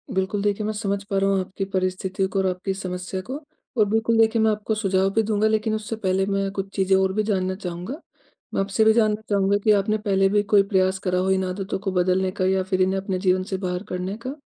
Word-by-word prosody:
बिल्कुल 190 Hz, +2 st, 0 dB
देखिए, 205 Hz, +1 st, 0 dB
मैं 215 Hz, -, -1 dB
समझ 200 Hz, -1 st, -2 dB
पा 200 Hz, 0 st, -2 dB
रहा 195 Hz, 0 st, +2 dB
हूँ 195 Hz, -1 st, +2 dB
आपकी 190 Hz, +1 st, -4 dB
परिस्थिति 185 Hz, +1 st, -1 dB
को 195 Hz, +1 st, -2 dB
और 190 Hz, -, +1 dB
आपकी 185 Hz, +1 st, -2 dB
समस्या 185 Hz, 0 st, -5 dB
को। 260 Hz, +8 st, -6 dB, 0.4 s
और 215 Hz, -, +5 dB
बिल्कुल 225 Hz, +2 st, +1 dB
देखिए, 225 Hz, 0 st, +4 dB
मैं 220 Hz, 0 st, +4 dB
आपको 215 Hz, +1 st, -2 dB
सुझाव 195 Hz, -2 st, +1 dB
भी 225 Hz, -, +3 dB
दूँगा। 215 Hz, 0 st, +1 dB
लेकिन 220 Hz, 0 st, +1 dB
उससे 215 Hz, +1 st, -4 dB
पहले 190 Hz, -3 st, 0 dB
मैं 195 Hz, 0 st, 0 dB
कुछ 195 Hz, -1 st, -4 dB
चीज़ें 190 Hz, -1 st, +3 dB
और 190 Hz, 0 st, +1 dB
भी 215 Hz, +2 st, +1 dB
जानना 190 Hz, -3 st, 0 dB
चाहूँगा। 180 Hz, -, -6 dB, 0.6 s
मैं -, -, +1 dB
आपसे 195 Hz, +2 st, 0 dB
ये -, -, +4 dB
भी 220 Hz, -, +7 dB
जानना 215 Hz, -2 st, +2 dB
चाहूँगा 200 Hz, 0 st, +3 dB
कि 215 Hz, -, +4 dB
आपने 210 Hz, +1 st, +2 dB
पहले 195 Hz, -2 st, +2 dB
भी 205 Hz, +1 st, +2 dB
कोई 200 Hz, -, +8 dB
प्रयास 190 Hz, 0 st, +2 dB
करा 180 Hz, 0 st, +1 dB
हो 190 Hz, +1 st, +1 dB
इन 190 Hz, 0 st, +2 dB
आदतों 190 Hz, +2 st, -3 dB
को 195 Hz, 0 st, -3 dB
बदलने 185 Hz, +1 st, +1 dB
का, 185 Hz, 0 st, -2 dB
या 190 Hz, 0 st, +2 dB
फिर 185 Hz, 0 st, 0 dB
इन्हें 190 Hz, +1 st, +1 dB
अपने 190 Hz, -1 st, -3 dB
जीवन 185 Hz, 0 st, +2 dB
से 190 Hz, -, +1 dB
बाहर 180 Hz, -1 st, -3 dB
करने 180 Hz, +2 st, -3 dB
का। 275 Hz, +4 st, -5 dB
195 Hz, 250 wpm, -23 LUFS, 185-210 Hz, 0.6 s, कोई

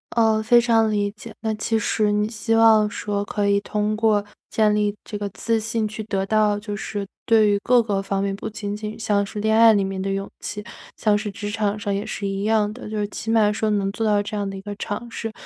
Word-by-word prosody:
呃， 220 Hz, -2 st, +3 dB
非 240 Hz, +2 st, +5 dB
常 225 Hz, -2 st, +3 dB
理 205 Hz, -1 st, 0 dB
解。 215 Hz, +2 st, -11 dB
那 220 Hz, -1 st, -1 dB
其 225 Hz, +1 st, 0 dB
实 215 Hz, -1 st, +1 dB
你 210 Hz, 0 st, +1 dB
希 225 Hz, 0 st, -1 dB
望 220 Hz, -2 st, +5 dB
说 205 Hz, -2 st, -3 dB
可 205 Hz, 0 st, -1 dB
以 200 Hz, 0 st, +3 dB
通 210 Hz, +1 st, -1 dB
过 215 Hz, -2 st, +2 dB, 0.2 s
建 215 Hz, -1 st, +2 dB
立 210 Hz, -1 st, +1 dB
这 210 Hz, -, -6 dB
个 205 Hz, -1 st, -3 dB
自 225 Hz, +3 st, -1 dB
信 220 Hz, 0 st, -1 dB
去 215 Hz, +1 st, -6 dB
得 195 Hz, -2 st, -1 dB
到 210 Hz, 0 st, +2 dB
就 205 Hz, 0 st, -5 dB
是 205 Hz, 0 st, -4 dB, 0.2 s
对 220 Hz, -2 st, +5 dB
于 200 Hz, -, +2 dB
各 245 Hz, -1 st, +4 dB
个 200 Hz, -3 st, -1 dB
方 195 Hz, 0 st, -2 dB
面 200 Hz, -1 st, -1 dB
不 200 Hz, -, -5 dB
仅 205 Hz, -1 st, -5 dB
仅 210 Hz, 0 st, -6 dB
像 205 Hz, -2 st, +1 dB
是 200 Hz, +1 st, -6 dB
恋 220 Hz, +1 st, +2 dB
爱 230 Hz, 0 st, +8 dB
里 205 Hz, -2 st, +2 dB
面 195 Hz, 0 st, -3 dB
的 195 Hz, +1 st, -2 dB
勇 195 Hz, 0 st, -2 dB
气， 210 Hz, -, -5 dB, 0.3 s
像 210 Hz, -2 st, +2 dB
是 210 Hz, +1 st, -2 dB
职 205 Hz, +1 st, -5 dB
场 210 Hz, -1 st, -1 dB
上 200 Hz, -1 st, -2 dB
也 200 Hz, -, -1 dB
是 200 Hz, -, -4 dB
一 195 Hz, 0 st, -3 dB
样 215 Hz, -1 st, +2 dB
的。 230 Hz, -2 st, -9 dB
就 215 Hz, -, -4 dB
是 205 Hz, -1 st, -1 dB
起 220 Hz, -, -6 dB
码 220 Hz, -2 st, +4 dB
说 220 Hz, 0 st, -1 dB
能 200 Hz, -2 st, 0 dB
做 205 Hz, +3 st, -4 dB
到 210 Hz, -1 st, +3 dB
这 205 Hz, +1 st, -5 dB
样 200 Hz, -1 st, -2 dB
的 195 Hz, -, -6 dB
一 -, -, -8 dB
个 205 Hz, +1 st, -6 dB
尝 220 Hz, +3 st, -5 dB
试， 225 Hz, -1 st, -4 dB
210 Hz, 270 characters per minute, -22 LUFS, 205-220 Hz, 0.3 s, 爱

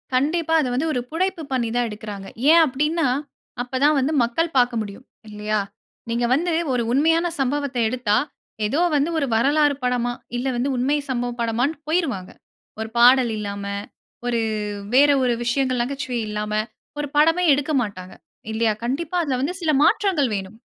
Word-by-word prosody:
கண்டிப்பா. 320 Hz, +5 st, +1 dB
அதை 260 Hz, -, -1 dB
வந்து 290 Hz, +6 st, 0 dB
ஒரு 250 Hz, -, 0 dB
புனைப்பு 350 Hz, +1 st, -1 dB
பண்ணி 240 Hz, -3 st, 0 dB
தான் 245 Hz, -1 st, +1 dB
எடுக்கிறாங்க. 205 Hz, -2 st, -7 dB, 0.2 s
ஏன் 335 Hz, 0 st, +7 dB
அப்படின்னா, 300 Hz, +4 st, 0 dB, 0.5 s
அப்ப 250 Hz, +1 st, -4 dB
தான் 300 Hz, +1 st, +5 dB
வந்து 275 Hz, +4 st, 0 dB
மக்கள் 320 Hz, +7 st, -1 dB
பார்க்க 245 Hz, -2 st, +3 dB
முடியும், 205 Hz, +5 st, -8 dB, 0.2 s
இல்லையா? 210 Hz, 0 st, -2 dB, 0.5 s
நீங்க 235 Hz, +1 st, 0 dB
வந்து 340 Hz, +6 st, +1 dB, 0.2 s
ஒரு 240 Hz, -, +1 dB
உண்மையான 325 Hz, +6 st, +3 dB
சம்பவத்தை 270 Hz, -2 st, -1 dB
எடுத்தா, 230 Hz, -4 st, +1 dB, 0.5 s
ஏதோ 280 Hz, +10 st, 0 dB, 0.2 s
வந்து 290 Hz, +3 st, +2 dB
ஒரு 285 Hz, -, +1 dB
வரலாறு 285 Hz, +5 st, +3 dB
படமா, 245 Hz, -1 st, 0 dB, 0.2 s
இல்லை 265 Hz, +2 st, -1 dB
வந்து 260 Hz, +3 st, 0 dB
உண்மை 270 Hz, +4 st, +1 dB
சம்பவ 245 Hz, -1 st, -1 dB
படமான்ட்டு 245 Hz, +7 st, -1 dB
போய்ருவாங்க. 275 Hz, -, -1 dB, 0.5 s
ஒரு 220 Hz, -, -4 dB
பாடல் 245 Hz, -1 st, +6 dB
இல்லாம, 200 Hz, -1 st, -5 dB, 0.6 s
ஒரு 235 Hz, -1 st, +1 dB, 0.6 s
வேற 290 Hz, +2 st, +7 dB
ஒரு 245 Hz, -, +2 dB
விஷயங்கள் 255 Hz, 0 st, 0 dB
நகைச்சுவை 260 Hz, -1 st, -3 dB
இல்லாம, 210 Hz, 0 st, -3 dB, 0.5 s
ஒரு 290 Hz, -, -2 dB
படமே 330 Hz, +4 st, +4 dB
எடுக்க 290 Hz, +2 st, -1 dB
மாட்டாங்க, 185 Hz, -4 st, -6 dB, 0.4 s
இல்லையா? 220 Hz, -1 st, +2 dB
கண்டிப்பா, 300 Hz, +8 st, -2 dB
அதுல 265 Hz, -4 st, -1 dB
வந்து 320 Hz, +7 st, -1 dB
சில 320 Hz, -2 st, +2 dB
மாற்றங்கள் 360 Hz, -, +2 dB
வேணும். 195 Hz, +3 st, -6 dB
255 Hz, 155 wpm, -22 LUFS, 235-300 Hz, 0.6 s, ஏன்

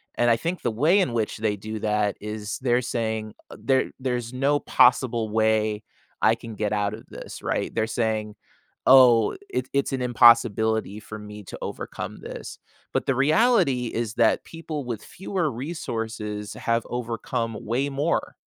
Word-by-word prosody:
and 120 Hz, -, +3 dB
I -, -, +5 dB
think 170 Hz, +9 st, -3 dB
the 120 Hz, -, 0 dB
way 155 Hz, -, +3 dB
in 160 Hz, -11 st, +1 dB
which 110 Hz, -2 st, -1 dB
they 110 Hz, -1 st, 0 dB
do 110 Hz, +2 st, -6 dB
that 105 Hz, -1 st, 0 dB
is, 105 Hz, 0 st, -5 dB
they're 125 Hz, -1 st, +3 dB
saying, 110 Hz, -3 st, -3 dB, 0.2 s
"There 135 Hz, -1 st, +1 dB
there's 125 Hz, -2 st, -2 dB
no 140 Hz, +3 st, +2 dB
possible 120 Hz, -4 st, +3 dB
way 110 Hz, -1 st, +1 dB, 0.4 s
I 110 Hz, -, +5 dB
can 115 Hz, -1 st, -9 dB
get 105 Hz, 0 st, -1 dB
out 105 Hz, -1 st, 0 dB
of 115 Hz, -, -14 dB
this," -, -, -9 dB
right? -, -, -1 dB
They're 110 Hz, -, +1 dB
saying, 110 Hz, -2 st, -1 dB, 0.5 s
"Oh, 125 Hz, -, +7 dB
it 385 Hz, -, -2 dB
it's 140 Hz, 0 st, 0 dB
an 130 Hz, -, -1 dB
impossibility 110 Hz, -3 st, +4 dB
for 110 Hz, 0 st, -9 dB
me 105 Hz, 0 st, -9 dB
to -, -, -9 dB
overcome -, -, -6 dB
this." -, -, -8 dB, 0.4 s
But -, -, 0 dB
the 135 Hz, -, +2 dB
reality 155 Hz, -, +3 dB
is 115 Hz, -1 st, -3 dB
that 115 Hz, -, +3 dB
people 165 Hz, -3 st, -6 dB
with 115 Hz, -3 st, -5 dB
fewer 180 Hz, -4 st, -3 dB
resources 115 Hz, -7 st, -4 dB
have 115 Hz, 0 st, -1 dB
overcome 115 Hz, -1 st, -3 dB
way 130 Hz, +6 st, 0 dB
more. 145 Hz, +5 st, -1 dB
115 Hz, 160 wpm, -25 LUFS, 110-130 Hz, 0.5 s, Oh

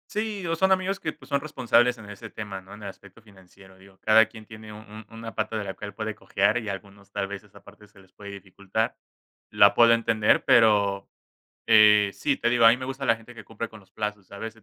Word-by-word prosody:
Sí, 210 Hz, -3 st, -4 dB
o 165 Hz, 0 st, -1 dB
son 190 Hz, +3 st, +2 dB
amigos 190 Hz, +1 st, +1 dB
que, -, -, -4 dB
pues, -, -, -18 dB
son 140 Hz, -1 st, +1 dB
responsables 125 Hz, -4 st, +1 dB
en 105 Hz, -2 st, -12 dB
ese 105 Hz, +2 st, -10 dB
tema, 100 Hz, -3 st, -7 dB
¿no? 95 Hz, +1 st, -15 dB
En 105 Hz, 0 st, -12 dB
el 100 Hz, -, -5 dB
aspecto 100 Hz, +3 st, -16 dB
financiero, 95 Hz, -2 st, -19 dB
digo, 95 Hz, 0 st, -19 dB
cada 110 Hz, +1 st, +5 dB
quien 110 Hz, -1 st, -14 dB
tiene 110 Hz, 0 st, -12 dB
un 110 Hz, 0 st, -12 dB
una 115 Hz, 0 st, -9 dB
pata 110 Hz, 0 st, -2 dB
de 105 Hz, -, -3 dB
la 95 Hz, -1 st, -5 dB
piel 100 Hz, 0 st, -9 dB
puede 110 Hz, 0 st, -5 dB
cojear, 100 Hz, +1 st, 0 dB
y 115 Hz, -3 st, -5 dB
algunos 100 Hz, 0 st, -9 dB
tal 100 Hz, -1 st, -3 dB
vez 100 Hz, 0 st, -8 dB
esa 105 Hz, -, -19 dB
parte 105 Hz, +1 st, -17 dB
se 100 Hz, -1 st, -22 dB
les 95 Hz, -1 st, -21 dB
puede 100 Hz, -1 st, -11 dB
dificultar, 100 Hz, +2 st, -4 dB, 0.6 s
la -, -, +5 dB
puedo 115 Hz, 0 st, +6 dB
entender, 115 Hz, -2 st, +2 dB
pero, 100 Hz, -3 st, +3 dB, 0.6 s
eh, 105 Hz, -2 st, +6 dB
sí, 140 Hz, -2 st, -1 dB
te -, -, 0 dB
digo, 120 Hz, -1 st, +4 dB
mí 115 Hz, -, +4 dB
me 130 Hz, -, -7 dB
gusta 135 Hz, +1 st, -5 dB
la 115 Hz, -, +3 dB
gente 115 Hz, +2 st, -15 dB
que 115 Hz, -, -12 dB
cumple 115 Hz, +1 st, -6 dB
con 110 Hz, -1 st, -14 dB
los 95 Hz, -, -24 dB
plazos. 105 Hz, -3 st, -5 dB
A 100 Hz, -, -9 dB
veces 110 Hz, 0 st, -8 dB
110 Hz, 240 wpm, -25 LUFS, 100-115 Hz, 0.6 s, puedo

